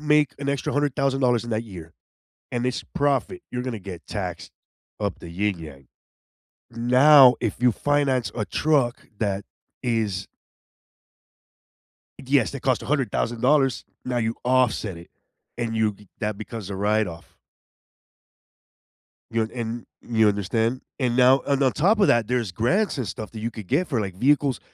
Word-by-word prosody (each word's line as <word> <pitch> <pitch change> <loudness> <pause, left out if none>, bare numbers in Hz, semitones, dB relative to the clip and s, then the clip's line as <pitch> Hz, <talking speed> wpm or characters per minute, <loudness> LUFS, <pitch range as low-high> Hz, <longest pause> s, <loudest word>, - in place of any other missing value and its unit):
make 150 -2 +3
an 140 0 -4
extra 140 -1 -1
$100,000 135 -4 +1
in 120 - -6
that 110 +1 -1
year 85 -6 -10 0.6
and 120 0 -1
it's 125 - -2
profit, 145 +6 0
you're 125 - -2
going 125 -2 -3
to 110 - -5
get 95 -3 -9
taxed 90 -6 -5 0.5
up 100 -3 -2
the 85 - -9
ying-yang. 85 -8 -4 0.8
Now, 125 +2 +6
if - - -1
you 125 - +5
finance 140 -1 +1
a 110 - -2
truck 135 - 0
that 100 -2 -1 0.4
is 110 -6 -1 2.0
Yes, 135 -2 +3
that 140 - -7
cost 130 -2 +1
$100,000, 130 0 +1 0.2
now 125 -1 -2
you 115 0 0
offset 125 -7 +1
it, 85 - -14 0.5
and 115 -2 -2
you 110 -1 +2
get 100 0 -19
that 105 -2 -2
because 110 -2 -7
of 100 - -4
write-off. 100 -4 -1 1.9
You 115 0 +1
know, 110 - -12
and 115 -1 -4 0.2
You 110 -2 +2
understand? 110 +5 -1 0.2
And 125 -3 +1
now 130 +2 +6
And 140 0 +1
on 130 - +4
top 200 +8 +3
of 200 - +5
that, 120 -2 +3
there's 120 -5 -1
grants 165 - +1
and 125 - -2
stuff 105 +3 -6
that 110 - -8
you 115 +2 -3
could 105 -4 -9
get 170 - +1
for, 130 -7 -1
like, 95 -3 -5
vehicles 140 +3 +2
120 Hz, 155 wpm, -24 LUFS, 105-135 Hz, 2.0 s, Now